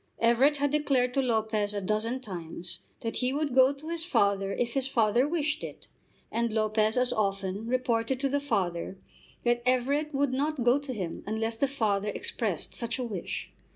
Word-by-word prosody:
Everett 245 +6 +4
had 285 0 +1
declared 270 -4 +2
to 275 - +2
Lopez 220 -4 0
a - - 0
dozen 215 +6 -1
times 175 -5 -6 0.2
that 225 - -3
he 250 0 +1
would 290 -1 -1
go 260 +1 +6
to 285 +3 -9
his 335 -1 0
father 200 - +2
if 235 +3 -1
his 270 -1 +3
father 240 0 +3
wished 310 -2 -1
it, - - -8 0.4
and 235 0 0
Lopez 215 +1 +1
as 250 0 +3
often 195 0 -1
reported 245 0 0
to 275 - +2
the 285 +1 +1
father 195 -9 -2 0.5
that 240 0 +2
Everett 270 +5 +1
would 280 -2 +1
not 285 0 0
go 245 +4 +4
to 285 -2 -6
him 180 -5 -4
unless 225 +1 -1
the 275 +5 +1
father 210 -7 0
expressed - - -2
such 235 +1 -2
a 255 - -2
wish. 210 -7 -5
240 Hz, 185 wpm, -29 LUFS, 215-275 Hz, 0.5 s, go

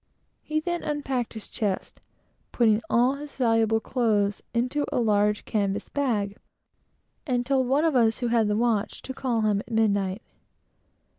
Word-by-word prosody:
He 310 0 -1
then 345 +2 -2
unpacked 270 -6 -2
his 220 - -8
chest, 200 -4 -3 0.5
putting 220 -2 +3
all 245 +3 +3
his 295 0 -9
valuable 225 -3 +2
clothes 210 -5 0
into 255 +5 0
a - - -1
large 210 -2 +2
canvas 200 -2 -1
bag, 215 -8 -1 0.9
and 245 -2 0
told 265 -1 +1
one 280 +5 +2
of 320 -4 +2
us, 225 -3 +3
who 245 -2 -1
had 230 -2 +3
the 210 0 +1
watch, 225 -3 0
to 265 - -6
call 250 -4 -1
him 210 -2 +2
at 210 - -9
midnight. 205 -2 +1
230 Hz, 155 wpm, -26 LUFS, 210-260 Hz, 0.9 s, putting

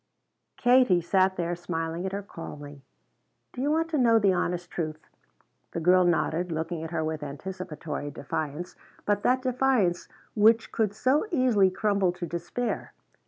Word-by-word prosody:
Katie 245 -7 +5
sat 190 +2 +2
there 175 0 -2
smiling 165 +1 -3
at - - -4
her 200 +1 -4
calmly. 145 -6 -9 0.7
"Do 250 - -5
you 285 - +1
want 325 +2 +1
to 310 -3 0
know 230 -2 +5
the 200 -3 +3
honest 175 0 -2
truth?" 155 -2 -5 0.7
The - - -2
girl 180 +2 +5
nodded, 175 0 +1
looking 160 +1 -3
at 160 - -5
her 160 -1 -2
with 155 -1 -3
anticipatory 150 0 -6
defiance, 150 +4 -5 0.3
but 205 -1 +1
that 255 +3 +2
defiance 250 -8 +1 0.3
which 225 +2 +4
could 210 -3 0
so 265 - +2
easily 250 - +3
crumble 200 -1 +1
to 175 -1 -5
despair. 175 +9 -4
180 Hz, 155 wpm, -27 LUFS, 165-225 Hz, 0.7 s, Katie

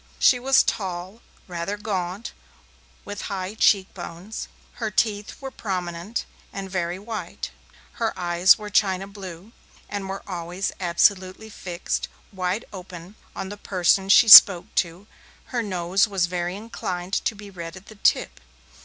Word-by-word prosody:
She 250 - +5
was 265 +2 +4
tall, 185 +2 -4 0.3
rather 180 +3 -4
gaunt, 195 0 -4 0.7
with 205 0 -6
high 190 0 -4
cheek 200 -3 +3
bones; 180 +4 -7 0.3
her 220 - 0
teeth 210 0 -1
were 270 -1 -7
prominent 180 0 -4 0.3
and 195 -1 -7
very 175 -1 -2
white; 215 +2 -6 0.5
her 225 - +2
eyes 175 +1 +4
were 210 -1 -8
china 195 -2 +2
blue, 195 0 -10 0.4
and 200 -2 -5
were 195 +1 -5
always 180 +1 -3
absolutely 185 +3 +1
fixed, 180 -3 -4 0.2
wide 190 +4 -2
open, 180 -1 -10 0.2
on 195 -1 -5
the 205 - -7
person 190 0 +1
she 215 - +7
spoke 195 -4 +10
to; 175 +3 -1 0.5
her 240 - +1
nose 190 0 +1
was 185 -4 0
inclined 180 0 -4
to 220 - 0
be 205 -1 -11
red 170 -2 -8
at 185 - -14
the - - -13
tip. 205 - +1
190 Hz, 140 wpm, -24 LUFS, 180-205 Hz, 0.7 s, spoke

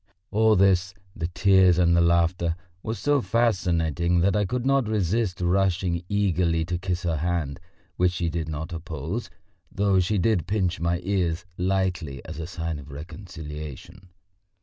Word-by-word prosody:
All 110 +1 +4
this 95 0 +3 0.2
the 80 - -2
tears 95 0 +4
and 85 -1 +4
the 85 - +4
laughter 85 0 +2 0.3
were 110 - -3
so 145 +3 +1
fascinating 90 - +1
that 100 +4 +2
I 105 -1 +2
could 125 +5 -2
not 135 -3 +2
resist 105 -1 0
rushing 90 -1 +1
eagerly 90 -5 +1
to 85 0 -3
kiss 90 0 -2
her 85 -3 0
hand, 80 -3 -2 0.4
which 90 0 +2
she 85 0 -1
did 80 -1 -3
not 80 +2 -5
oppose, 80 - -5 0.4
though 100 -1 +2
she 95 +4 +1
did 90 -2 +1
pinch 95 -3 0
my 85 +1 0
ears 90 -3 -1
lightly 90 -7 -1
as - - -7
a 80 - -4
sign 80 -3 -4
of 70 0 -12
reconciliation. 75 +1 -9
90 Hz, 155 wpm, -25 LUFS, 85-95 Hz, 0.4 s, All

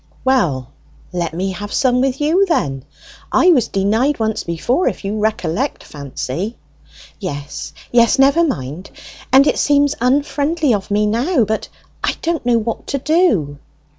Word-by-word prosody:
"Well, 145 - +1 0.4
let 170 -2 -2
me 190 +2 -1
have 205 +3 -7
some 250 -3 +2
with 265 0 0
you, 335 +7 +2
then. 135 - -1 0.5
I 365 - +5
was 255 -9 +3
denied 220 +9 +1
once 220 -1 -1
before, 235 - 0
if - - -3
you 210 +2 -2
recollect, 215 - -1
Fancy." 145 - -5 0.6
"Yes, 145 -8 -6 0.2
yes, 235 +1 +4
never 275 +5 +4
mind! 155 - -3 0.4
And 270 +2 +7
it - - +1
seems 285 0 +3
unfriendly 285 +3 +1
of 200 -1 -2
me 210 +1 +2
now, 245 - +1
but 220 +1 -2 0.4
I - - 0
don't 330 -2 -1
know 240 -1 +4
what 230 0 -3
to 280 - -1
do." 270 - +1
230 Hz, 150 wpm, -18 LUFS, 185-280 Hz, 0.6 s, And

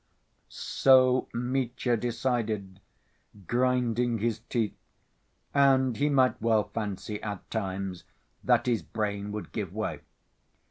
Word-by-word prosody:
So 130 -1 +4
Mitya 125 0 -1
decided, 115 -5 -2 0.7
grinding 120 0 +1
his 110 0 -1
teeth, 115 -4 0 0.8
and 135 -3 +4
he 145 +4 +1
might 130 -5 +3
well 110 -2 +2
fancy 105 -1 -4
at 105 -3 -6
times 95 -1 -3 0.4
that - - +3
his 120 -3 +1
brain 105 -2 -3
would 105 0 -6
give 100 -6 -4
way. 95 -7 -3
115 Hz, 105 wpm, -28 LUFS, 105-125 Hz, 0.8 s, So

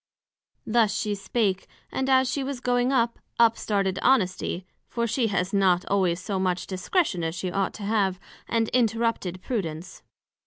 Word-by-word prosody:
Thus 220 -2 +2
she 215 -2 -1
spake, 200 -1 -1 0.2
and 265 0 -1
as 260 0 +4
she 275 +1 -1
was 270 -1 -4
going 245 +1 +1
up, 235 -3 +1 0.2
up 230 -1 +5
started 195 -4 -1
Honesty 190 -7 +1 0.2
(for 235 -1 -1
she 230 +1 +1
has 195 -2 -1
not 185 -3 +3
always 185 -3 +2
so 190 +1 -3
much 185 -1 0
discretion 190 - 0
as 165 +1 -2
she 185 0 -3
ought 195 0 -1
to 210 - -8
have) 200 -3 +1 0.3
and 230 -1 +1
interrupted 225 -6 0
Prudence. 180 -6 -4
205 Hz, 160 wpm, -26 LUFS, 185-235 Hz, 0.3 s, up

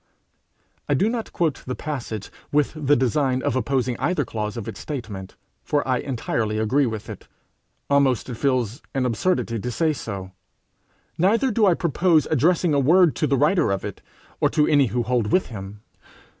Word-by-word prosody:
I 145 - +3
do 200 +11 +2
not 230 -1 -4
quote 160 -5 -1
the 125 - -2
passage 120 -9 -5 0.2
with 150 0 +2
the 145 -2 +2
design 130 0 +1
of - - 0
opposing 130 -2 0
either 150 +2 0
clause 105 0 -4
of 115 - -5
its - - -7
statement, 105 -10 -6 0.3
for 145 -2 0
I 130 -1 +1
entirely 115 -4 -2
agree 130 +6 +2
with 110 -2 -5
it: - - -9 0.6
almost 140 -4 +2
it 125 - -5
feels 125 -1 -1
an 130 -1 +1
absurdity 115 -1 0
to 125 - -4
say 155 +6 +1
so. 100 -8 -6 0.9
Neither 230 +9 +3
do 215 -1 +3
I 180 - +4
propose 170 -1 +2
addressing 165 +2 +3
a 140 - +3
word 165 +4 +4
to 155 - +1
the 140 0 +2
writer 150 - +3
of 95 - -2
it, - - -7 0.4
or - - +3
to 150 - +2
any 145 -4 +4
who 120 +2 -1
hold 120 -3 0
with 185 - +2
him. 100 -2 -8
135 Hz, 180 wpm, -23 LUFS, 115-155 Hz, 0.9 s, I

